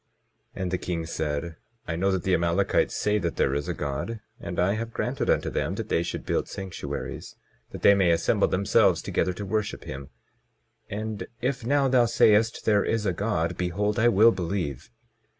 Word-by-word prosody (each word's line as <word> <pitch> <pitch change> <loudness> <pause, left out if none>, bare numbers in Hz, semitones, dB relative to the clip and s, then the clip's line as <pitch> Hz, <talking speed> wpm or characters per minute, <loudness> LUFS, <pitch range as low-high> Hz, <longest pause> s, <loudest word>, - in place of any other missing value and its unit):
And 95 -2 -3
the 90 - -1
king 85 -2 -3
said: 80 +1 -3 0.3
I 80 - -2
know 95 +4 +1
that 95 -1 -1
the 95 - +1
Amalekites 85 +3 +1
say 105 0 +1
that - - -2
there 65 - +1
is 70 +1 -2
a - - -1
God, 75 +11 -4 0.2
and 85 - -5
I 90 +3 +3
have 115 +2 -4
granted - - -2
unto - - +1
them 75 +6 -1
that 110 +1 -5
they - - +2
should 85 - -4
build - - -1
sanctuaries, 95 -2 -6 0.3
that - - -9
they 100 - +8
may 95 -3 +3
assemble 85 0 +2
themselves 100 +1 +3
together 90 - 0
to 100 +3 -6
worship 105 +1 -2
him. 65 0 -7 0.8
And 110 +1 -4
if 125 0 -2
now 140 +3 +2
thou 125 -2 +4
sayest 115 -1 +3
there 105 -2 +4
is 115 -2 -1
a 95 - +1
God, 85 -5 -1
behold 105 +5 -1
I 120 - +4
will 115 0 +6
believe. 90 - -3
95 Hz, 185 wpm, -26 LUFS, 85-110 Hz, 0.8 s, they